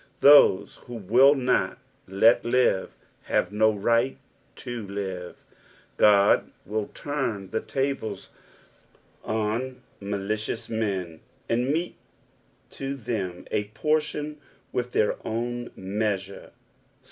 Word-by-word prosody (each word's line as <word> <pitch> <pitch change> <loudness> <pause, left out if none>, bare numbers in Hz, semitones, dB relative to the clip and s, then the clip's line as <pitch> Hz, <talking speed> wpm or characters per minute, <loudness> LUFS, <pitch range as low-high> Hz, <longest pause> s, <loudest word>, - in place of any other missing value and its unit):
Those 140 -9 +6
who 120 - -7
will 120 +7 +5
not 130 -2 +1 0.3
"let 100 +5 +4
live" 120 -5 +1 0.3
have 90 - 0
no 110 +1 +4
right 115 +5 +1 0.4
to 120 -4 -6
"live." 95 -3 -5 0.6
God 100 -1 +5 0.2
will 105 +1 -2
turn 125 -10 -3
the 110 - -1
tables 135 -7 -3 0.9
on 115 +4 -2 0.2
malicious 105 +3 -3
men, 95 -7 -2 0.3
and 120 +3 0
mete 165 +4 -2 0.7
to 135 0 -4
them 100 -8 -4
a 105 - 0
portion 150 -1 -1 0.3
with 125 0 -3
their 105 - +2
own 120 +2 -3
meaaure. 100 0 -3
110 Hz, 100 wpm, -26 LUFS, 100-125 Hz, 0.9 s, Those